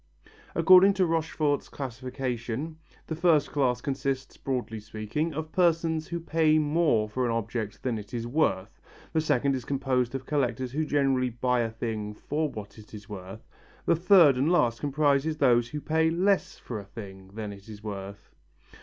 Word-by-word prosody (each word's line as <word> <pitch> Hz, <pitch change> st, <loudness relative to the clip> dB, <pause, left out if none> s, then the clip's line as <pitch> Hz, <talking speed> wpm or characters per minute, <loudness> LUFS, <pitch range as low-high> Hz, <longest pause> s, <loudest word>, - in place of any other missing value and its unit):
According 190 Hz, +1 st, +7 dB
to 190 Hz, -2 st, +3 dB
Rochefort's 160 Hz, -3 st, 0 dB
classification, 130 Hz, +2 st, -4 dB, 0.3 s
the 160 Hz, -, -4 dB
first 165 Hz, -2 st, +3 dB
class 125 Hz, -4 st, +1 dB
consists, 135 Hz, -1 st, -3 dB
broadly 125 Hz, -4 st, -3 dB
speaking, 110 Hz, +9 st, -3 dB
of 160 Hz, +1 st, -4 dB
persons 165 Hz, -3 st, +1 dB
who 170 Hz, -, -3 dB
pay 160 Hz, -1 st, +2 dB
more 150 Hz, -7 st, +2 dB
for 125 Hz, +4 st, -2 dB
an 120 Hz, -, +1 dB
object 110 Hz, -1 st, -3 dB
than 120 Hz, -4 st, -1 dB
it 105 Hz, -, -11 dB
is 115 Hz, -1 st, -3 dB
worth; 120 Hz, -7 st, -1 dB, 0.3 s
the 160 Hz, -, +2 dB
second 140 Hz, -3 st, +1 dB
is 130 Hz, -2 st, -3 dB
composed 130 Hz, -2 st, 0 dB
of 130 Hz, -1 st, -5 dB
collectors 130 Hz, -4 st, -1 dB
who 155 Hz, +4 st, -1 dB
generally 135 Hz, -3 st, +1 dB
buy 125 Hz, +1 st, 0 dB
a 115 Hz, -1 st, 0 dB
thing 110 Hz, -2 st, -4 dB
for 150 Hz, +6 st, -2 dB
what 105 Hz, -3 st, -9 dB
it 110 Hz, 0 st, -12 dB
is 105 Hz, -1 st, -11 dB
worth; 95 Hz, +2 st, -9 dB, 0.4 s
the 170 Hz, -, +4 dB
third 170 Hz, -5 st, +6 dB
and 140 Hz, +6 st, +2 dB
last 120 Hz, -10 st, +2 dB
comprises 145 Hz, +1 st, +1 dB
those 120 Hz, -4 st, +4 dB
who 150 Hz, -, -4 dB
pay 160 Hz, +2 st, +1 dB
less 190 Hz, +4 st, +1 dB
for 115 Hz, -4 st, -6 dB
a 100 Hz, -, -10 dB
thing 95 Hz, -2 st, -10 dB
than 105 Hz, -2 st, -5 dB
it 100 Hz, +2 st, -14 dB
is 105 Hz, -1 st, -10 dB
worth. 100 Hz, -1 st, -7 dB
130 Hz, 170 wpm, -27 LUFS, 115-155 Hz, 0.4 s, According